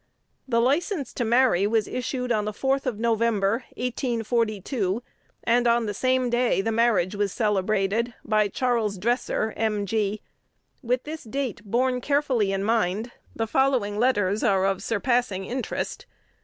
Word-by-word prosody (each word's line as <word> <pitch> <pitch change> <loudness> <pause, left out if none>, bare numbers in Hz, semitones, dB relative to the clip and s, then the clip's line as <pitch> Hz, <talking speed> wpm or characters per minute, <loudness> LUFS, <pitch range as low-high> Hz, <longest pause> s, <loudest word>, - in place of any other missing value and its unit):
The 230 -3 +2
license 285 - 0
to 245 - -2
marry 235 -5 +3
was 220 -1 +1
issued 250 0 -3
on 210 -2 +1
the 210 - -2
4th 270 +4 0
of 240 -5 -1
November, 230 -1 +1
1842, 230 -3 -1 0.4
and 240 +1 +3
on 235 0 +3
the 205 - -2
same 255 +2 +1
day 240 -2 +2
the 225 +4 0
marriage 220 -5 +2
was 205 -1 -1
celebrated 210 +2 0
by 215 -1 +2
Charles 225 -2 0
Dresser, 225 +1 -1
"M.G." 210 -1 -1 0.6
With 250 -1 0
this 310 +1 -7
date 255 -2 -3 0.4
carefully 275 -6 +1
borne 195 - 0
in - - -2
mind, 220 +1 0 0.2
the 225 - -1
following 235 -4 +1
letters 210 -5 +2
are 190 -1 +2
of 195 -1 0
surpassing 230 -3 0
interest. 250 +2 -4
230 Hz, 140 wpm, -25 LUFS, 205-250 Hz, 0.6 s, marry